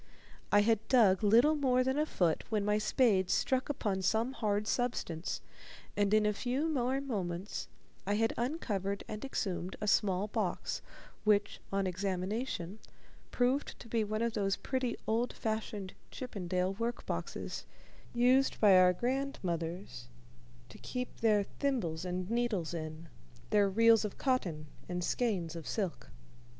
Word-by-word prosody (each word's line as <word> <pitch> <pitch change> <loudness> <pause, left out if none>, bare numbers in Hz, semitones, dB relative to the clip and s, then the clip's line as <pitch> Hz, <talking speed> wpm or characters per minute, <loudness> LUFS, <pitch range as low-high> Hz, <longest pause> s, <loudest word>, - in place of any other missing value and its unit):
I 205 - +6
had 220 0 +2
dug 215 -7 +5
little 235 +9 +6
more 255 -3 +3
than 265 +3 0
a 305 - +1
foot 170 - +1
when 210 -2 0
my 210 0 +2
spade 210 -4 +3
struck 260 +1 +1
upon 205 -9 -1
some 220 +7 +1
hard 210 -4 0
substance, 215 -9 -2 0.5
and 205 -1 +2
in 215 0 +4
a 210 - +2
few 255 +8 -1
more 265 -3 0
moments 195 -8 -3 0.4
I 205 - +2
had 225 +1 +2
uncovered 205 - -2
and 215 0 -6
exhumed 190 -8 -3
a - - -3
small 200 -2 +2
box, - - -2 0.4
which, 210 -1 +2
on 195 0 +1
examination, 190 +2 -2 0.5
proved 255 +3 0
to - - -11
be 230 -1 +1
one 215 +2 -1
of 235 -1 0
those 195 -2 +1
pretty 255 -3 -2
old 230 +3 0
fashioned 215 -3 -3 0.2
Chippendale 185 -6 -2
work 230 +4 -3
boxes - - -4 0.4
used 250 +3 +3
by 205 -3 +7
our 180 0 +6
grandmothers 175 - -3 0.6
to - - -13
keep 250 0 -5
their 215 -3 +3
thimbles 195 - -2
and 180 0 -3
needles 225 -7 -1
in, 155 0 -6 0.4
their 205 -1 +4
reels 225 +2 +5
of 210 - -4
cotton 180 - 0 0.2
and 180 0 -2
skeins 180 -8 -1
of 165 -3 -7
silk. 195 -6 -3
210 Hz, 145 wpm, -33 LUFS, 185-245 Hz, 0.6 s, by